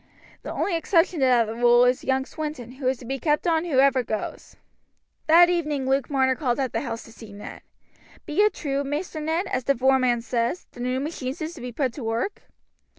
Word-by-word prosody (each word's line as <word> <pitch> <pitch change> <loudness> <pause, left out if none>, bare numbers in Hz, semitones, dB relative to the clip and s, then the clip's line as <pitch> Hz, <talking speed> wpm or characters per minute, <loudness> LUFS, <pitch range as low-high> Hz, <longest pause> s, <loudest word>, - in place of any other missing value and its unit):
The - - -6
only 375 - -1
exception 330 0 +2
to 265 - +3
that 240 -3 +4
rule 240 +2 +4
is 250 0 +1
young 265 0 0
Swinton, 300 -6 -6
who 260 0 -5
is 260 0 +1
to 245 - -12
be 270 +3 -3
kept 300 +3 +1
on 330 -1 +2
whoever 270 -4 +3
goes." 220 -3 -5 0.7
That 340 +2 +7
evening 305 -6 -1
Luke 270 -1 +1
Marner 265 -2 +2
called 255 -2 -1
at 265 -2 -1
the - - -1
house 230 -4 -5
to - - -14
see 225 -2 -12
Ned. 200 +1 -10 0.6
"Be 305 +6 +1
it 420 -2 +3
true, 280 -2 -2
Maister 300 +4 -4
Ned, 320 +5 -1
as 255 -9 -3
the 275 - +3
voreman 255 -2 +2
says, 235 +7 -1
the - - -15
new 250 +1 -1
machines 275 -2 -4
is 315 +2 -4
to 330 - -11
be 250 0 -5
put 255 0 -1
to 275 - -7
work?" 230 - -2
265 Hz, 210 wpm, -24 LUFS, 245-310 Hz, 0.7 s, That